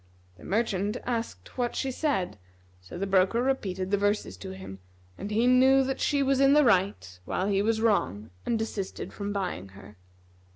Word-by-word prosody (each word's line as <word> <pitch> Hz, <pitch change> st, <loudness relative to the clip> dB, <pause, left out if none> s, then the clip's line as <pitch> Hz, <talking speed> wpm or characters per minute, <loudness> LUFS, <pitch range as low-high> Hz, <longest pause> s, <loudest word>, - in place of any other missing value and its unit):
The -, -, -16 dB
merchant 210 Hz, 0 st, 0 dB
asked 235 Hz, +1 st, -4 dB
what 240 Hz, -1 st, 0 dB
she 265 Hz, -, -1 dB
said: 250 Hz, -, -1 dB, 0.4 s
so 90 Hz, -, -10 dB
the 195 Hz, -, -1 dB
broker 190 Hz, +3 st, +3 dB
repeated 190 Hz, -8 st, -1 dB
the 205 Hz, -, +2 dB
verses 205 Hz, +1 st, 0 dB
to 190 Hz, -, -8 dB
him; 190 Hz, -, -9 dB, 0.4 s
and 200 Hz, -, -6 dB
he 220 Hz, +3 st, +2 dB
knew 260 Hz, +2 st, +5 dB
that 265 Hz, 0 st, -2 dB
she 285 Hz, -2 st, +2 dB
was 270 Hz, 0 st, +2 dB
in 275 Hz, 0 st, +6 dB
the 300 Hz, -1 st, +5 dB
right 180 Hz, -, +1 dB
while 185 Hz, -, -1 dB
he 200 Hz, -1 st, +2 dB
was 220 Hz, +1 st, +1 dB
wrong 110 Hz, -, 0 dB
and 235 Hz, -, 0 dB
desisted 220 Hz, -3 st, -4 dB
from 205 Hz, 0 st, -4 dB
buying 180 Hz, -, -3 dB
her. 105 Hz, 0 st, -14 dB
205 Hz, 180 wpm, -28 LUFS, 190-250 Hz, 0.4 s, in